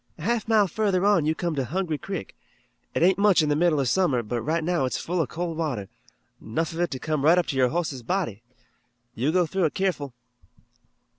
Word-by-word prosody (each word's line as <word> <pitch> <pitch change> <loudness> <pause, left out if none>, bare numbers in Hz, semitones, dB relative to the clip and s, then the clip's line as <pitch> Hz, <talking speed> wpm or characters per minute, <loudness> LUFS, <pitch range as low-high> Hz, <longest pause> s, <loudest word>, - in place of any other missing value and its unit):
"A 155 - -10
half 230 +3 0
mile 215 -3 +4
further 195 0 0
on 200 -7 +3
you 160 - +1
come 170 -1 -2
to 140 -3 -1
Hungry 160 +3 -2
Creek. 195 - -6 0.6
It - - +2
ain't 190 +2 +4
much 200 -5 +5
in 150 - 0
the 145 - +2
middle 160 -1 +2
of 135 - +1
summer, 140 -7 +2
but 120 +2 -3
right 160 +6 -1
now 170 -4 +1
it's 130 - -2
full 175 +1 -1
of 150 - -2
cold 170 -1 -4
water, 125 -12 -3 0.5
'nough 160 +9 -3
of 165 - -6
it 175 - +1
to 130 - -4
come 155 +1 -2
right 165 +4 +5
up 180 - +2
to 140 - -3
your 130 -1 +3
hoss's 155 -5 -2
body. 120 - -2 0.7
You 135 +7 0
go 180 +1 +3
through 190 +2 0
it 155 - -1
keerful." 150 -9 -2
165 Hz, 225 wpm, -25 LUFS, 140-180 Hz, 0.7 s, much